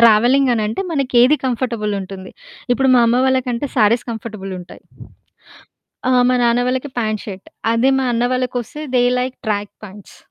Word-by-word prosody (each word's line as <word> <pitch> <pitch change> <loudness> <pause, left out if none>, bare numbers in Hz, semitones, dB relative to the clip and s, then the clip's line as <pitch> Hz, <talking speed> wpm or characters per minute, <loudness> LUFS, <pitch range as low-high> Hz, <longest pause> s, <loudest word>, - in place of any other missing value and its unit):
Travelling 240 +4 +5
అనంటే 220 - -2
మనకేది 265 -1 +3
comfortable 235 -4 -2
ఉంటుంది. 190 0 -9 0.4
ఇప్పుడు 265 +1 +1
మా 245 - +5
అమ్మ 245 +2 +2
వాళ్ళ 260 0 +3
కంటే 245 +4 -2
సారీస్ 230 +1 +3
కంఫర్టబుల్ 215 -3 -6
ఉంటాయి. 175 - -13 1.3
ఆ! - - +3 0.2
మా 255 - +3
నాన్న 235 +1 +3
వాళ్ళకి 260 +3 -2
పాంట్ 215 -2 -1
షర్ట్. 195 -2 -8 0.3
అదే 240 +4 +3
మా 265 - 0
అన్న 235 +1 0
వాళ్ళకొస్తే 255 +2 -3 0.2
దే 245 - +4 0.2
లైక్ 255 +1 -3
ట్రాక్ 205 -1 -2
పాంట్స్, 200 0 -13
235 Hz, 155 wpm, -18 LUFS, 215-255 Hz, 1.3 s, Travelling